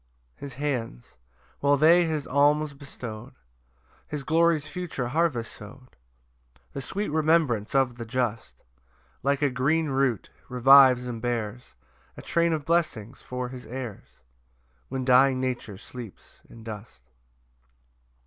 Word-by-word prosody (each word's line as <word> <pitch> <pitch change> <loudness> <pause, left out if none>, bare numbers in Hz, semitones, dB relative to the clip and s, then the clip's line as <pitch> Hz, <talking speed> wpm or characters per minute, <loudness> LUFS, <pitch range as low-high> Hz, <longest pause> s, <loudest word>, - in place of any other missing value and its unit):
3 - - -7
His 135 - -9
hands, 125 - -4 0.5
while 145 0 +3
they 170 +4 +5
his 155 -3 -2
alms 145 +2 +2
bestow'd, 125 -4 -9 0.7
His 150 -2 -5
glory's 165 0 +2
future 170 -10 -4
harvest 135 -6 0
sow'd; 125 +5 -13 0.8
The 140 - -4
sweet 200 +10 -3
remembrance 150 -8 +1
of 130 -3 +2
the 115 - -6
just, 120 -2 -3 0.6
Like 140 +2 0
a 140 - +2
green 155 +5 +1
root, 135 -5 0 0.2
revives 125 0 +6
and 120 -2 -5
bears 120 -1 -4 0.4
A - - -9
train 170 0 +1
of 155 -3 -2
blessings 150 -9 -1
for 125 0 -5
his 125 -1 -10
heirs, 120 -4 -8 0.7
When 130 -1 -3
dying 130 +1 +5
nature 125 -6 -3
sleeps 115 0 -12
in 115 - -13
dust. 105 - -9
130 Hz, 130 wpm, -26 LUFS, 120-150 Hz, 0.8 s, revives